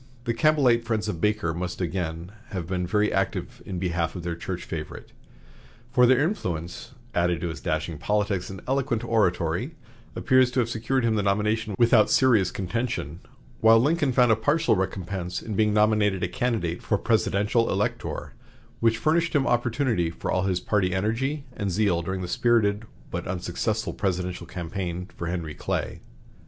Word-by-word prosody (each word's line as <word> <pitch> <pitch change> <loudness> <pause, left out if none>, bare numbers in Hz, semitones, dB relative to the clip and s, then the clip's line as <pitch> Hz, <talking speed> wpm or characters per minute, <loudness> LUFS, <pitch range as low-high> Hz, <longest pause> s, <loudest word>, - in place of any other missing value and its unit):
The 120 -2 -1
Campbellite 125 -2 +3
friends 110 -2 -1
of 85 -6 -4
Baker 105 -5 +1
must 90 +1 -4
have 90 - -1
again 85 0 -4 0.2
been 90 -1 -3
very 105 +3 +1
active 95 -2 -2
in 95 - -4
behalf 85 -2 -1
of 90 - -6
their 85 -1 -3
church 90 +1 -5
favorite; 80 -2 -7 0.8
for 125 -1 +5
their 130 +2 +5
influence, 90 - -3 0.2
added 85 -1 +1
to 85 - -2
his 80 - -7
dashing 80 -3 -2
politics 105 0 0
and 95 -1 -8
eloquent 135 -3 0
oratory, 95 - 0 0.4
appears 130 -1 +4
to 130 - +1
have 115 -1 0
secured 120 +3 0
him 110 -1 +2
the - - +2
nomination 105 +1 0
without 115 -3 +5
serious 115 -8 +4
contention, 90 - -3 0.4
while 115 0 +6
Lincoln 145 +2 +2
found 125 -1 +4
a - - +6
partial 150 +6 +2
recompense 95 -1 -3
in 110 - -6
being 105 +1 +2
nominated 105 -2 +2
a - - +2
candidate 90 -3 -1
for - - 0
presidential 105 +4 +1
elector, - - -2 0.5
which 115 -1 +3
furnished 165 +7 +1
him 140 -2 +3
opportunity 120 - +1
for 85 - -4
all 95 +1 +1
his 95 -2 +1
party 95 -1 0
energy 130 +9 -1
and 100 - -2
zeal 95 -2 +1
during 95 +2 -3
the 90 - -4
spirited 110 0 +2 0.3
but - - -4
unsuccessful 95 +5 -2
presidential 90 -2 -2
campaign 90 +1 -4
for 85 - -5
Henry 85 -3 -3
Clay. - - -3
105 Hz, 165 wpm, -25 LUFS, 90-115 Hz, 0.8 s, while